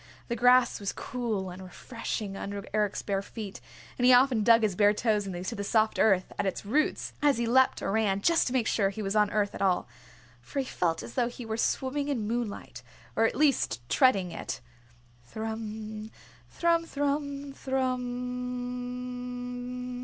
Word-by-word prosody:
The 235 - 0
grass 250 +1 +5
was 200 -1 -3
cool 220 -7 -3
and 180 +1 -9
refreshing 200 +1 -5
under 200 0 -5
Eric's 210 -2 0
bare 195 -1 -1
feet, 200 -1 -8 0.4
and 245 - +3
he - - +8
often 250 -2 +5
dug 230 +1 +6
his 205 -4 +1
bare 205 +1 +4
toes 210 -3 +1
into 180 0 -4
the 200 - -4
soft 220 +1 +2
earth 190 -4 +3
at - - +1
its 190 - -3
roots 290 +9 0
as 290 -3 +4
he 235 - 0
leapt 260 +3 +3
or - - 0
ran 200 -2 +1
just 335 +8 +3
to 250 - -2
make 250 -4 +2
sure 200 -3 +2
he 215 +2 -5
was 195 +1 -2
on 210 -1 +4
earth 205 -1 0
at - - -7
all. 185 -2 +2 0.5
For 125 - -9
he 270 - +1
felt 165 -8 -1
as 115 0 -9
though 235 - +1
he 245 0 -8
were 220 0 -2
swimming 265 +5 0
in 240 -8 -1
moonlight, 230 -2 -4 0.3
or 225 - +4
at - - +1
least 270 - +2
treading 195 -10 +3
it. - - -5 0.6
Thrum, 220 - -5 0.4
thrum, 335 -1 +2
thrum, 285 -1 -2
thrummmmmmmmmm. 250 -1 -4
230 Hz, 175 wpm, -29 LUFS, 205-250 Hz, 0.6 s, he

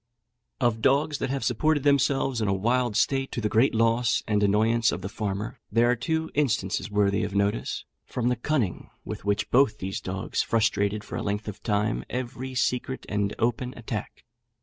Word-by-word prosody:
Of 120 -4 +1
dogs 140 +3 +2
that - - -2
have 135 0 -2
supported 145 +4 +1
themselves 140 -3 +2
in 105 - +1
a 100 - +2
wild 120 +2 +1
state, 135 +3 +1
to - - -2
the 110 - 0
great 115 +4 +3
loss 115 +1 +2
and 105 -2 +2
annoyance 110 +3 +3
of 90 - -5
the 95 - -3
farmer, 105 0 -4
there 120 +1 +4
are - - +2
two 160 +6 -2
instances 110 -8 0
worthy 100 -1 +2
of 100 - -3
notice, 100 -11 0 0.2
from 120 0 -1
the 125 - +2
cunning 120 -5 -1 0.2
with - - -6
which 100 +1 0
both 135 -2 +4
these 95 +1 -4
dogs 95 +1 -2
frustrated, 105 -2 +1
for - - -6
a - - -3
length 105 +1 -2
of 105 -1 -6
time, 105 +1 0
every 130 +1 -4
secret 125 +1 -1
and 105 -1 -1
open 120 +2 -1
attack. 115 -2 -6
115 Hz, 185 wpm, -26 LUFS, 105-130 Hz, 0.2 s, there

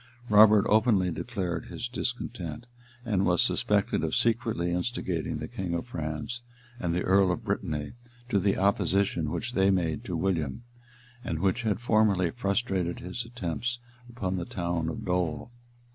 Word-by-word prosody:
[] 120 - -19
Robert 105 0 +7
openly 105 -4 +3
declared 90 -5 -3
his 120 - -4
discontent, 120 -5 -4 0.4
and 100 -5 +1
was 90 -3 +2
suspected - - +1
of 80 - 0
secretly 115 -7 +1
instigating 90 -3 -2
the - - -5
king 90 -3 -3
of 85 - -3
France 85 +4 -4 0.4
and 85 -5 -1
the 90 +1 0
earl 95 0 +4
of 90 - -3
Brittany 75 -1 -2 0.3
to 105 -5 +2
the 100 +1 +1
opposition 95 -4 +2
which 120 +10 -3
they 95 -2 +4
made 85 -6 0
to - - -3
William, 85 - -1 0.6
and 85 - -2
which 95 +8 +1
had 110 -4 0
formerly 110 -7 +3
frustrated 100 -5 -1
his 95 +7 -5
attempts 120 +1 -3 0.3
upon 95 -6 -3
the 85 - -3
town 85 -3 -2
of 110 +6 -5
Dol. 90 +2 -1
95 Hz, 155 wpm, -28 LUFS, 85-115 Hz, 0.6 s, Robert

